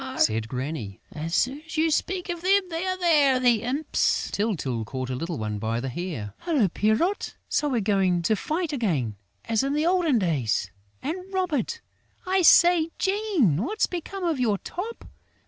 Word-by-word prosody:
said 110 Hz, 0 st, +2 dB
Granny. 125 Hz, -, -5 dB
"As 165 Hz, +2 st, -4 dB
soon 270 Hz, +4 st, +1 dB
as 315 Hz, -, -8 dB
you 320 Hz, +1 st, +3 dB
speak 365 Hz, +4 st, -1 dB
of 345 Hz, -1 st, -3 dB
them, 390 Hz, +3 st, +4 dB
they 330 Hz, +3 st, -2 dB
are 370 Hz, 0 st, -1 dB
there, 295 Hz, -7 st, +4 dB
the 240 Hz, -4 st, +3 dB
imps!" 270 Hz, +6 st, 0 dB
Tyltyl 155 Hz, -, -1 dB
caught 130 Hz, +3 st, -5 dB
a -, -, -2 dB
little 165 Hz, +6 st, -4 dB
one 105 Hz, -2 st, -3 dB
by 115 Hz, +2 st, -1 dB
the 135 Hz, +2 st, -3 dB
hair: 125 Hz, -, -5 dB
"Hullo, 280 Hz, -, +1 dB
Pierrot! 220 Hz, -, 0 dB
So 295 Hz, -, 0 dB
we're 245 Hz, -4 st, 0 dB
going 190 Hz, -4 st, +2 dB
to 215 Hz, +6 st, +2 dB
fight 315 Hz, -, -2 dB
again, 155 Hz, -, -1 dB, 0.3 s
as 225 Hz, -2 st, +1 dB
in 275 Hz, +1 st, -1 dB
the 300 Hz, +2 st, +1 dB
old 355 Hz, -1 st, +2 dB
days!... 135 Hz, -, 0 dB, 0.3 s
And 365 Hz, +6 st, -4 dB
Robert!... 365 Hz, -, -1 dB, 0.4 s
I 375 Hz, +1 st, +2 dB
say, 345 Hz, -1 st, +6 dB
Jean, 385 Hz, -, +1 dB
what's 370 Hz, -, 0 dB
become 365 Hz, +2 st, -6 dB
of 330 Hz, -6 st, 0 dB
your 220 Hz, -5 st, +2 dB
top?... 420 Hz, -, -6 dB
250 Hz, 175 wpm, -25 LUFS, -, 0.4 s, say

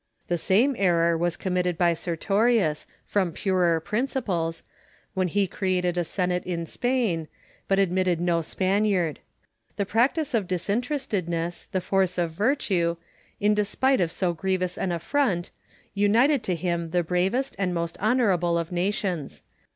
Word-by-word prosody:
The 175 Hz, -, +1 dB
same 225 Hz, -, +3 dB
eri'or 170 Hz, -3 st, +3 dB
was 175 Hz, +1 st, -1 dB
committed 180 Hz, -2 st, -1 dB
by 175 Hz, -1 st, +3 dB
Sertorius, 180 Hz, 0 st, +1 dB, 0.2 s
from 190 Hz, -4 st, 0 dB
purer 175 Hz, -2 st, +1 dB
principles, 200 Hz, -5 st, -2 dB, 0.5 s
when 190 Hz, -2 st, +1 dB
he 200 Hz, +3 st, +1 dB
created 180 Hz, -1 st, -1 dB
a 175 Hz, -, +1 dB
Senate 180 Hz, +1 st, -1 dB
in 170 Hz, -2 st, -3 dB
Spain, 225 Hz, -7 st, -1 dB, 0.4 s
but 195 Hz, -, +2 dB
admitted 185 Hz, -2 st, +2 dB
no 170 Hz, -1 st, +1 dB
Spaniard. 185 Hz, -2 st, 0 dB, 0.6 s
The 200 Hz, -, -1 dB
practice 255 Hz, -, +1 dB
of 215 Hz, -5 st, +1 dB
disinterestedness, 185 Hz, -, -2 dB
the 185 Hz, -, 0 dB
force 190 Hz, -1 st, +1 dB
of 170 Hz, -2 st, 0 dB
virtue, 185 Hz, -, 0 dB, 0.4 s
in 210 Hz, +1 st, +3 dB
despite 210 Hz, +5 st, +1 dB
of 165 Hz, -2 st, +1 dB
so 180 Hz, -1 st, 0 dB
gi'ievous 185 Hz, +1 st, -1 dB
an 185 Hz, -, -2 dB
affront, 175 Hz, -, 0 dB, 0.4 s
united 230 Hz, +8 st, +3 dB
to 180 Hz, -, 0 dB
him 170 Hz, -1 st, -2 dB
the 175 Hz, +1 st, +1 dB
bravest 190 Hz, +10 st, 0 dB
and 190 Hz, -2 st, 0 dB
most 170 Hz, -1 st, -2 dB
honourable 195 Hz, -7 st, +2 dB
of 170 Hz, 0 st, -3 dB
nations. 180 Hz, -3 st, -2 dB
185 Hz, 140 wpm, -25 LUFS, 170-205 Hz, 0.6 s, same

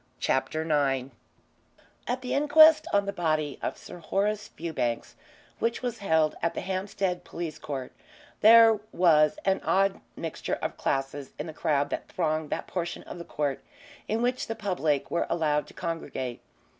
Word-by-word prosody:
CHAPTER 145 Hz, +4 st, 0 dB
IX 140 Hz, -4 st, +1 dB, 1.0 s
At 250 Hz, +1 st, -1 dB
the 250 Hz, -, -2 dB
inquest 310 Hz, +2 st, +6 dB
on 200 Hz, 0 st, +3 dB
the 200 Hz, -, -3 dB
body 155 Hz, -5 st, -1 dB
of -, -, -3 dB
Sir -, -, -11 dB
Horace 205 Hz, +5 st, -1 dB
Fewbanks, 145 Hz, -8 st, -3 dB, 0.5 s
which 230 Hz, +2 st, -1 dB
was 240 Hz, -2 st, -3 dB
held 160 Hz, -6 st, +2 dB
at 170 Hz, -, 0 dB
the -, -, -2 dB
Hampstead 190 Hz, -1 st, -2 dB
Police 170 Hz, -3 st, -6 dB
Court, 135 Hz, -3 st, -5 dB, 0.5 s
there 225 Hz, 0 st, +8 dB
was 155 Hz, -4 st, +4 dB
an 195 Hz, 0 st, +2 dB
odd 195 Hz, 0 st, +2 dB
mixture -, -, -3 dB
of -, -, -4 dB
classes 135 Hz, 0 st, -2 dB
in 150 Hz, -, -4 dB
the 160 Hz, -, -7 dB
crowd 145 Hz, -2 st, 0 dB
that -, -, -3 dB
thronged 155 Hz, -3 st, -1 dB
that -, -, -3 dB
portion 175 Hz, -2 st, -4 dB
of 175 Hz, -, -9 dB
the -, -, -6 dB
court 140 Hz, -4 st, -3 dB, 0.4 s
in 225 Hz, +2 st, 0 dB
which 250 Hz, +1 st, 0 dB
the 225 Hz, -, -3 dB
public 180 Hz, -9 st, -1 dB
were 170 Hz, -, 0 dB
allowed 150 Hz, -3 st, +1 dB
to -, -, -16 dB
congregate. 155 Hz, -8 st, -4 dB
170 Hz, 160 wpm, -27 LUFS, 150-205 Hz, 1.0 s, there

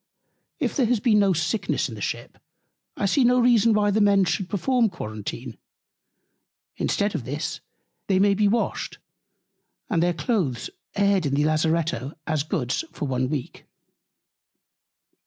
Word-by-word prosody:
If -, -, -1 dB
there 260 Hz, -6 st, +2 dB
has 240 Hz, -1 st, +2 dB
been 210 Hz, 0 st, +3 dB
no 200 Hz, -1 st, +4 dB
Sickness 170 Hz, +5 st, 0 dB
in -, -, -8 dB
the -, -, -9 dB
Ship, -, -, -5 dB, 0.6 s
I -, -, 0 dB
see 255 Hz, +8 st, +3 dB
no 250 Hz, +1 st, +4 dB
reason 235 Hz, -2 st, +4 dB
why 210 Hz, -1 st, +3 dB
the 215 Hz, +2 st, +2 dB
Men 200 Hz, -2 st, +4 dB
should 185 Hz, 0 st, -1 dB
perform 235 Hz, +3 st, +1 dB
Quarentine. 110 Hz, -, -7 dB, 1.2 s
Instead 205 Hz, 0 st, 0 dB
of 155 Hz, -, -3 dB
this, 145 Hz, +6 st, -4 dB, 0.5 s
they 190 Hz, -, +2 dB
may 200 Hz, +1 st, +4 dB
be 205 Hz, +1 st, +2 dB
washed, 225 Hz, +3 st, -1 dB, 0.9 s
and 165 Hz, -, +2 dB
their 175 Hz, 0 st, +1 dB
Cloaths 155 Hz, -, -1 dB, 0.2 s
aired 200 Hz, -5 st, +2 dB
in 140 Hz, -, 0 dB
the 145 Hz, +1 st, +2 dB
Lazaretto, 155 Hz, -3 st, 0 dB
as 155 Hz, -3 st, 0 dB
Goods, 135 Hz, -, -2 dB
for -, -, -4 dB
one 130 Hz, -1 st, -1 dB
Week. 145 Hz, -4 st, -5 dB
185 Hz, 150 wpm, -24 LUFS, 150-210 Hz, 1.2 s, no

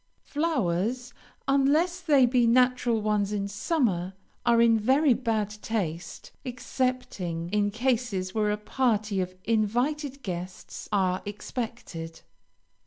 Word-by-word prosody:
Flowers, 245 Hz, -, -1 dB, 0.3 s
unless 295 Hz, +6 st, +3 dB
they 285 Hz, -7 st, +5 dB
be 245 Hz, -1 st, +3 dB
natural 245 Hz, -2 st, +3 dB
ones 210 Hz, -1 st, +1 dB
in 200 Hz, -1 st, -1 dB
summer, 200 Hz, -, 0 dB, 0.3 s
are 235 Hz, -1 st, +5 dB
in 230 Hz, -1 st, +6 dB
very 265 Hz, +5 st, +4 dB
bad 220 Hz, -4 st, -1 dB
taste, 175 Hz, -7 st, -4 dB
excepting 245 Hz, -9 st, -3 dB
in 205 Hz, 0 st, +2 dB
cases 220 Hz, -5 st, -1 dB
where 215 Hz, -1 st, +1 dB
a 210 Hz, -, 0 dB
party 210 Hz, -3 st, 0 dB
of 185 Hz, 0 st, -4 dB
invited 255 Hz, +6 st, 0 dB
guests 180 Hz, -2 st, -6 dB
are 185 Hz, -2 st, +1 dB
expected. 205 Hz, -6 st, -6 dB
225 Hz, 110 wpm, -27 LUFS, 200-255 Hz, 0.3 s, in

